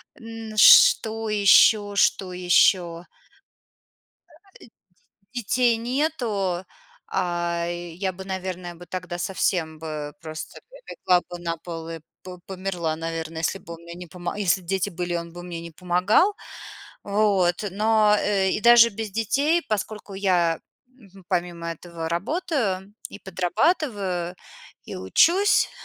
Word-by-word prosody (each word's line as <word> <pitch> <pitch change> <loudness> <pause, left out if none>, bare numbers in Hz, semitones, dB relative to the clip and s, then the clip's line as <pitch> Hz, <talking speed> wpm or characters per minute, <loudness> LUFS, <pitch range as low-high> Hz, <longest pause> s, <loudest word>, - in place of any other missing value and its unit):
Н 225 -4 -9
что 220 +1 +6
ещё? 205 0 +5
Что 185 -2 +2
ещё? 180 -1 +2 1.3
А - - -20 0.8
а, 200 +1 -45
и 245 - -3
Детей 240 +2 +2
нету. 230 - -2 0.4
А, 175 -2 -1
я 175 +2 -4
бы, 190 +1 -10
наверное, 185 -2 -5
бы 175 +1 -13
тогда 180 -1 -6
совсем 175 -4 -1
бы 150 -2 -6
просто 155 -1 -8
бы - - -14
легла 180 -1 +2
бы 175 - -7
на 165 -1 -3
пол 165 -1 -8
и 165 -1 -7 0.2
по 180 -1 -10
померла, 180 -4 -3
наверно, 165 0 -5
если 170 +4 -1
бы 170 -2 -10
он 165 - -14
мне 170 0 -10
не 180 0 -9
помо 175 +3 -6
если 190 -1 +1
б 175 - -18
дети 195 +2 -1
были 175 0 -4
и - - +1
он 170 0 -6
бы 175 0 -9
мне 175 -2 -7
не 170 0 -9
помогал. 180 - +2 0.7
Вот, 200 -3 +1
но, 215 +1 +3
э, 195 -2 +1
и - - -1
даже 235 0 +7
без 215 0 -6
детей, 280 - +1
поскольку 210 -1 -4
я, 175 -4 +1 0.3
мгм, 200 -8 -19
помимо 175 -2 -2
этого 165 0 -7
работаю 200 - -2 0.2
и - - -11
подрабатываю, 190 - -1 0.5
и - - -7
учусь 340 - +3
185 Hz, 140 wpm, -24 LUFS, 175-210 Hz, 1.3 s, даже